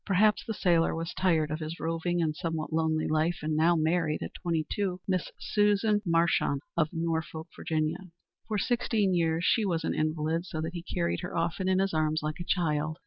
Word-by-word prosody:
Perhaps 210 +2 +3
the 225 - -1
sailor 170 -5 +2
was 165 +1 -4
tired 160 -5 +1
of 155 - -2
his 160 +1 -5
roving 165 +1 -1
and 155 -1 -1
somewhat 160 -1 -3
lonely 160 -1 +1
life, 155 +2 +1
and 155 0 0
now 165 +3 +4
married, 160 -1 +1
at - - -6
twenty 165 -3 -1
two, 190 -3 -2
Miss 185 -2 -1
Susan 210 0 +2
Marchant 165 -4 +2
of 160 -2 +2
Norfolk, 160 -1 -2
Virginia. 160 +4 -2 0.4
For 215 - -1
sixteen 220 -3 +1
years 165 0 +1
she 225 - +3
was 170 -5 0
an - - 0
invalid, 155 +2 -1
so 160 - -4
that 160 +2 -4
he 175 - -4
carried 170 0 -1
her 180 - -5
often 170 +3 0
in 185 - +3
his 195 -1 +1
arms 155 0 +1
like 155 +2 -3
a - - -3
child. 155 -3 0
165 Hz, 200 wpm, -29 LUFS, 155-180 Hz, 0.4 s, now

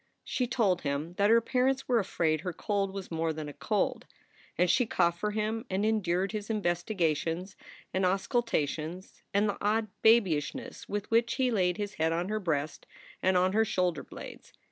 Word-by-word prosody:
She 250 - -1
told 210 -7 +1
him 145 +4 -2
that 200 +1 +4
her 230 +1 +6
parents 260 +3 +1
were 245 -2 +3
afraid 160 -6 0
her 180 0 -4
cold 200 +2 -1
was 195 -2 -7
more 165 0 0
than 155 -1 -5
a 145 - -7
cold, - - -1 0.5
and 180 +2 +4
she 235 +7 +3
coughed 170 -4 +1
for 210 - 0
him 215 +2 -2
and 190 +2 0
endured 195 -3 +1
his 215 -1 -5
investigations 175 -3 -1 0.4
and 190 - +1
auscultations 185 - -1
and 205 +2 +2
the 205 - -2
odd 215 +1 +1
babyishness 195 -10 +2
with 205 +1 -3
which 230 +2 +3
he 260 -2 +1
laid 180 -5 +1
his 205 0 -3
head 160 0 +3
on 175 +3 -1
her 215 0 -1
breast 155 -6 -2 0.3
and 185 0 +3
on 185 +1 +3
her 220 +1 +4
shoulder 180 -7 0
blades. - - -11
190 Hz, 180 wpm, -30 LUFS, 170-220 Hz, 0.5 s, her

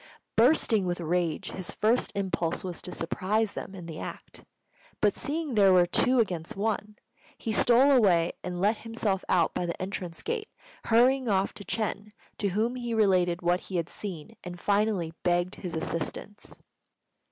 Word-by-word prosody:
Bursting 225 -5 +4
with 175 0 -2
rage, 170 -1 -1
his 185 -2 -5
first 230 +4 +1
impulse 185 -4 -1
was 180 -2 -5
to 180 - -6
surprise 200 +6 -1
them 195 - -7
in 180 -3 -8
the 160 -2 -7
act; - - -8 0.6
but 205 -2 +3
seeing 305 -1 -3
there 200 -3 +5
were 180 -1 +6
two 250 +8 +2
against 175 -7 -1
one, 210 0 -2 0.4
he 225 - -3
stole 245 +5 +5
away 185 -10 +4
and 180 -1 -4
let 210 +4 +2
himself 225 -4 -2
out 170 -3 +3
by 175 - -2
the 170 - -4
entrance 185 -3 -5
gate, 450 -1 -3 0.4
hurrying 250 +2 +4
off 195 -1 +1
to - - -8
Ch'êng, 210 -1 -3 0.3
to 200 - +1
whom 220 +6 0
he 240 -2 -3
related 185 -5 +2
what 175 +1 +2
he 190 - -8
had 170 -1 -1
seen, 195 +1 -7
and 180 -1 -7
finally 200 -4 +1
begged 175 +1 +1
his 180 -4 -5
assistance. 165 +5 -4
195 Hz, 165 wpm, -28 LUFS, 175-225 Hz, 0.6 s, were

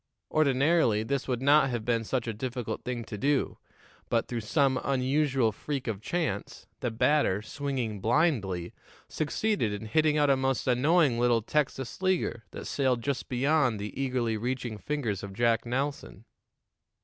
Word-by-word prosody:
Ordinarily, 140 -5 +3
this 135 +3 -2
would 125 -1 -2
not 140 0 +5
have 120 -3 -3
been 115 -2 +1
such 125 +2 -2
a 115 - -3
difficult 120 -1 -4
thing 125 -2 -3
to 105 -2 -7
do, 140 +3 0 0.5
but, 115 -1 +1
through 120 -2 -3
some 130 +3 +1
unusual 135 -2 +1
freak 135 +4 -4
of 105 -4 -3
chance, 150 - -3
the 120 - -1
batter, 110 -3 +2
swinging 130 -6 -3
blindly, 110 - +1 0.3
succeeded 155 - -1
in 105 +1 -5
hitting 155 +7 +2
out 145 -1 +4
a - - +5
most 135 0 0
annoying 135 +1 +3
little 120 -2 +3
Texas 135 - -2
leaguer 185 -11 0
that - - -8
sailed 130 -4 0
just 140 -2 -2
beyond 130 -3 +2
the 105 +1 -5
eagerly 125 -4 -1
reaching 120 -1 -3
fingers 120 -10 -2
of 100 -1 -7
Jack 115 +2 +1
Nelson. 130 -4 -3
125 Hz, 155 wpm, -28 LUFS, 115-140 Hz, 0.5 s, not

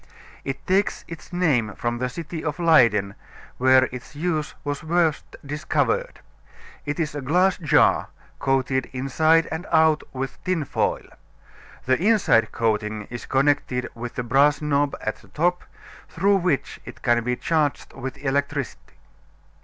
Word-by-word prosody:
It 135 0 -5
takes 195 +2 0
its 165 +1 -10
name 140 - +1
from 120 0 -2
the 125 0 -1
city 160 +4 -6
of 150 -2 -3
Leyden, 115 - +4 0.5
where 130 0 +6
its 125 +2 -9
use 155 -1 -2
was 145 -1 -3
first 165 -2 0
discovered. 155 - -1 0.7
It 150 +3 -2
is 155 -4 -1
a 145 - -4
glass 180 +7 +2
jar, 155 -7 +3 0.3
coated 130 -1 0
inside 155 +5 +2
and 160 +4 -4
out 160 -1 +4
with 135 0 -6
tin 180 -5 -1
foil. - - -1 0.8
The 130 +4 +2
inside 205 - +3
coating 105 -1 -1
is 120 - -7
connected 135 -2 +1
with 120 +1 -7
a 125 - -1
brass 140 +4 +3
knob 145 -1 0
at - - -3
the - - -20
top, 175 +3 0 0.4
through 195 +4 +2
which 180 -6 -1
it - - -12
can 120 -1 +2
be 125 +1 0
charged 150 0 -1
with 135 +1 -6
electricity. 140 -1 -2
145 Hz, 145 wpm, -23 LUFS, 125-165 Hz, 0.8 s, where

